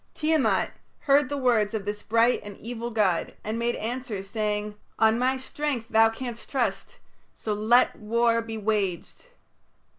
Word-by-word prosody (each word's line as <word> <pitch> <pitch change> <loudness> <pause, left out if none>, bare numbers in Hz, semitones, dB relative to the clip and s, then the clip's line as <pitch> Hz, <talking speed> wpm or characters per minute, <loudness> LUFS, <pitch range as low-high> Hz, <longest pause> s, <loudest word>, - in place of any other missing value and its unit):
Tiamat 310 -2 +1 0.3
heard 280 -2 +3
the 285 - -2
words 230 -5 +2
of 205 -2 -3
this 205 0 -4
bright 230 +2 +3
and 205 -1 -9
evil 235 0 -5
god, 205 -7 0
and 220 +2 -3
made 235 +1 0
answer, 230 -3 -4
saying, 210 +1 -2 0.2
"On 220 +1 +4
my 260 +1 +2
strength 260 -3 -3
thou 225 0 +5
canst 235 0 -7
trust. 220 -8 -2 0.4
So 215 - -3
let 220 +4 +3
war 230 +1 +1
be 225 -1 -6
waged." 205 - -2
225 Hz, 150 wpm, -26 LUFS, 210-245 Hz, 0.4 s, thou